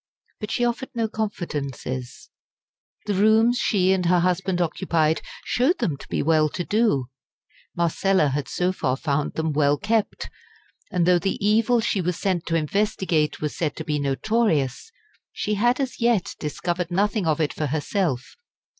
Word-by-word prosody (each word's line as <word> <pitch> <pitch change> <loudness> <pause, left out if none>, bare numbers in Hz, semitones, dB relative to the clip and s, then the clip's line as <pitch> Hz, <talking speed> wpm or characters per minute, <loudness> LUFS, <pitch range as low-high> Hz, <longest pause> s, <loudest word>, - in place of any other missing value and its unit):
But 210 - -5
she 240 - +1
offered 240 +2 -2
no 230 -1 0
confidences; 145 - -5 0.7
the 205 - 0
rooms 220 +4 +4
she 190 -3 +2
and 180 -2 0
her 175 0 +4
husband 180 +1 0
occupied 160 -2 +1 0.2
showed 265 +9 +2
them 170 - -1
to - - -12
be - - -1
well 155 -1 +3
to 175 - -4
do; 200 - +1 0.7
Marcella 170 -1 +2
had 140 +1 -2
so 180 +1 0
far 135 -8 -1
found 145 0 -1
them 160 -1 -1
well 145 0 +3
kept; 215 +2 -1 0.6
and 175 -2 +1
though 180 0 +4
the 195 +2 -1
evil 220 +4 +3
she 200 -3 0
was 180 0 -1
sent 185 -4 -1
to 165 - 0
investigate 165 -2 0
was 150 -1 -2
said 155 -4 -2
to - - -5
be 150 -1 -1
notorious, 145 - 0 0.4
she 210 - -2
had 240 +5 +2
as 265 -2 -3
yet 230 -5 +2
discovered 175 +3 -3
nothing 200 +1 0
of 155 -1 +1
it 155 -2 0
for 150 - -2
herself. 145 - -2
180 Hz, 165 wpm, -24 LUFS, 150-210 Hz, 0.7 s, rooms